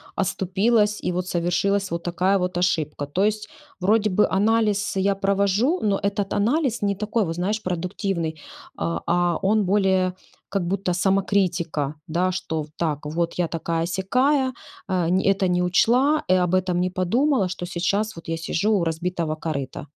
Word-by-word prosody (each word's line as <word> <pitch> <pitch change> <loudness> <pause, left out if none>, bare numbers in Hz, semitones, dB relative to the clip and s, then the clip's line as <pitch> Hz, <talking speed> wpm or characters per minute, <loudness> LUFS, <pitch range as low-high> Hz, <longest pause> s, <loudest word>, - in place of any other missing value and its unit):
оступилась, 210 +3 +1
и - - +1
вот 180 +1 -2
совершилась, 180 +3 0
вот 170 0 -3
такая 185 +3 +1
вот 180 -1 -2
ошибка? 155 -5 0
То 185 +7 0
есть 215 +3 -1 0.3
вроде 210 +3 +2
бы 200 +3 +3
анализ 210 0 +1
я 195 +1 +2
провожу, 200 - +1
но 200 -2 +1
этот 200 0 -1
анализ 240 +3 +1
не 200 -1 +1
такой, 215 +1 -1
вот, 165 0 -3
знаешь, 210 +5 -2
продуктивный, 175 -2 -3 0.4
а 85 +1 -2
а 175 0 +2
он 210 +1 +2
более, 190 -2 +2 0.4
как 190 -4 -1
будто 185 -1 -1
самокритика. 180 -6 0
Да, 180 +3 0
что, 160 -4 -3
в - - -11
так, 150 -3 -2
вот 165 +3 -1
я 175 -2 0
такая-сякая, 190 - 0 0.4
э, 180 -3 +1
нь 185 +1 +2
это 195 -1 +2
не 180 0 +1
учла, 250 +11 +3
и - - +5
об 180 -1 +2
этом 180 -1 +1
не 185 - +1
подумала, 200 +5 +1
что 180 -1 -5
сейчас 195 +4 -1
вот 165 - -11
я 165 - -1
сижу 185 +6 -1
у 175 - 0
разбитого 165 -1 -2
корыта. 140 -4 -4
185 Hz, 165 wpm, -23 LUFS, 175-205 Hz, 0.4 s, и